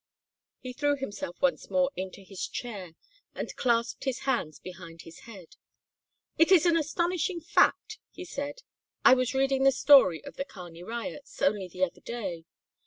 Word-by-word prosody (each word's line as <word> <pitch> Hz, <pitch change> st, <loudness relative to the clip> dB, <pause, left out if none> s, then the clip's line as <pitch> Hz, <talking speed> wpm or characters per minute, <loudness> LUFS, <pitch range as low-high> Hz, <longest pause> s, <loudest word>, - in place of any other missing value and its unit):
He 255 Hz, -1 st, -7 dB
threw 290 Hz, +2 st, +1 dB
himself 205 Hz, -9 st, -6 dB
once 275 Hz, -, +1 dB
more 275 Hz, 0 st, +2 dB
into 190 Hz, +1 st, -6 dB
his 190 Hz, -1 st, -5 dB
chair 200 Hz, -9 st, -6 dB, 0.4 s
and -, -, -5 dB
clasped 235 Hz, 0 st, 0 dB
his 265 Hz, -2 st, -2 dB
hands 240 Hz, -, -1 dB
behind 170 Hz, -2 st, -11 dB
his 165 Hz, -, -13 dB
head. 190 Hz, -7 st, -13 dB, 0.8 s
"It 330 Hz, +3 st, +5 dB
is 360 Hz, -4 st, +7 dB
an 340 Hz, -1 st, +4 dB
astonishing 340 Hz, +3 st, 0 dB
fact," 350 Hz, +5 st, +2 dB
he 360 Hz, -, -9 dB
said 285 Hz, -4 st, -5 dB
"This -, -, -17 dB, 0.4 s
I -, -, +9 dB
was 255 Hz, 0 st, +1 dB
reading 270 Hz, 0 st, +2 dB
the 270 Hz, -, +5 dB
history 265 Hz, -, +6 dB
of -, -, -10 dB
the 275 Hz, -, -2 dB
Kearney 175 Hz, -9 st, -11 dB
riots, 235 Hz, +8 st, -7 dB
only 195 Hz, -1 st, +2 dB
the 180 Hz, +1 st, -3 dB
other 180 Hz, -, -2 dB
day. 190 Hz, -9 st, -5 dB
250 Hz, 170 wpm, -28 LUFS, 185-285 Hz, 0.8 s, I